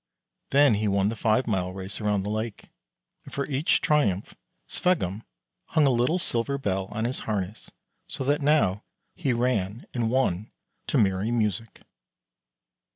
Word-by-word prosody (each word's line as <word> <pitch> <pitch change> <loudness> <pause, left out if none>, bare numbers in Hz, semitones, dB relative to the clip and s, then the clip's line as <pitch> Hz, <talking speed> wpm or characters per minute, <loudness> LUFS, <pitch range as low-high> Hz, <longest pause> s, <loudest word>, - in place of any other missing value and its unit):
Then 140 -2 +5
he 105 +1 0
won 100 0 +2
the 115 - -3
five 110 +3 +2
mile 90 -4 -1
race 95 +3 -7
around 105 -2 +1
the 105 - -3
lake; 110 0 -4 0.5
and - - -12
for 140 - -2
each 145 +2 +1
triumph 105 -11 +1 0.3
Sveggum 110 - 0 0.4
hung 155 - +2
a 135 - +4
little 125 +8 +2
silver 140 -4 0
bell 95 -7 -1
on 110 +3 -3
his 125 +2 -2
harness, 105 0 -3 0.4
so - - -4
that 145 +3 +1
now 140 -10 +3 0.3
he 145 -7 -1
ran 120 -3 0
and 115 -3 0
won 115 -6 0 0.4
to - - +1
merry 95 +1 +2
music. 110 -2 -2
110 Hz, 155 wpm, -26 LUFS, 100-130 Hz, 0.5 s, Then